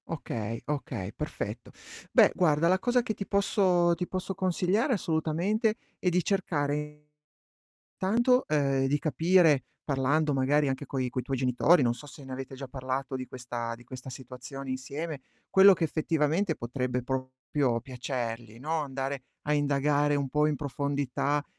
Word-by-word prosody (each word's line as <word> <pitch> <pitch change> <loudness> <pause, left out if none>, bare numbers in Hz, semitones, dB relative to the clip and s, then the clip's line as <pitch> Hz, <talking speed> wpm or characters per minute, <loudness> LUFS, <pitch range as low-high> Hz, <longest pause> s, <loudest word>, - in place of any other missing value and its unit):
Okay, 115 -8 -4
okay, 125 -9 -4
perfetto. 115 -7 -5 0.4
Beh - - +6
guarda 160 -2 +3
la 185 +2 +3
cosa 245 +2 +2
che 225 - -2
ti 200 - -5
posso 190 -4 +3
ti 180 +1 -3
posso 185 +1 -3
consigliare 190 - +1
assolutamente 185 +5 0 0.2
è 180 - +2
di 180 0 +1
cercare 150 -5 -1 0.9
intanto 240 +6 +2
uhm, 135 -3 +2
di 145 +2 +2
capire, 160 0 +4 0.2
parlando 145 +2 +1
magari 140 +2 +2
anche 135 +2 -2
coi 130 -1 -1
coi 130 +1 -2
tuoi 135 +2 -3
genitori, 130 +5 +4
non 120 -1 +2
so 120 +4 -11
se 145 - -12
ne 130 - -9
avete 135 +1 -6
già 135 0 -7
parlato 130 +1 -3
di 130 0 -4
questa 120 -2 -5
di 120 - -16
questa 130 +1 -9
situazione 130 +1 -8
insieme, 140 +3 -5 0.3
quello 195 +1 +8
che 170 - -2
effettivamente 160 +3 +1
potrebbe 125 +1 -2
proprio 130 -1 -1
piacergli, 120 -3 -5
no, 155 +4 -1
andare 135 -1 -3 0.2
a 150 - 0
indagare 145 0 +2
un 140 -2 -1
po' 150 +2 +2
in 150 - +1
profondità, 140 +1 -1
145 Hz, 155 wpm, -29 LUFS, 130-165 Hz, 0.9 s, quello